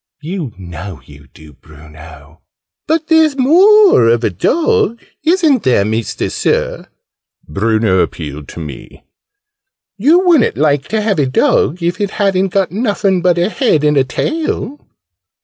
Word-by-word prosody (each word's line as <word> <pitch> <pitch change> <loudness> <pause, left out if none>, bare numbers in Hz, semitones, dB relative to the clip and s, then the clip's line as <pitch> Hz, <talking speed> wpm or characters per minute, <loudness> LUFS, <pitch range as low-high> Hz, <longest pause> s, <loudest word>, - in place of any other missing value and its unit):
"You 165 -5 -5
know 90 -1 -9
you 70 0 -16
do, 75 -1 -16
Bruno!" 75 0 -16 0.5
"But 320 0 0
there's 320 -3 +2
more 365 - +5
of 115 +1 +1
a 110 - 0
dog, 320 - 0 0.2
isn't 320 - +2
there, 120 -6 +1
Mister 110 +1 -3
Sir?" - - -2 0.6
Bruno 110 +3 0
appealed 75 -5 -4
to - - -10
me. 75 -4 -10 1.0
"You 330 - +3
wouldn't 330 -9 +3
like 145 -1 0
to 220 -1 -1
have 205 -5 -1
a 140 - +1
dog 145 +5 0
if 175 +4 -2
it 200 - -1
hadn't 195 -2 +1
got 190 0 -1
nuffin 200 -3 -1
but 175 -1 +2
a 175 +3 +1
head 220 - 0
and 150 0 +2
a 135 - +3
tail?" 295 - -4
175 Hz, 145 wpm, -14 LUFS, -, 1.0 s, more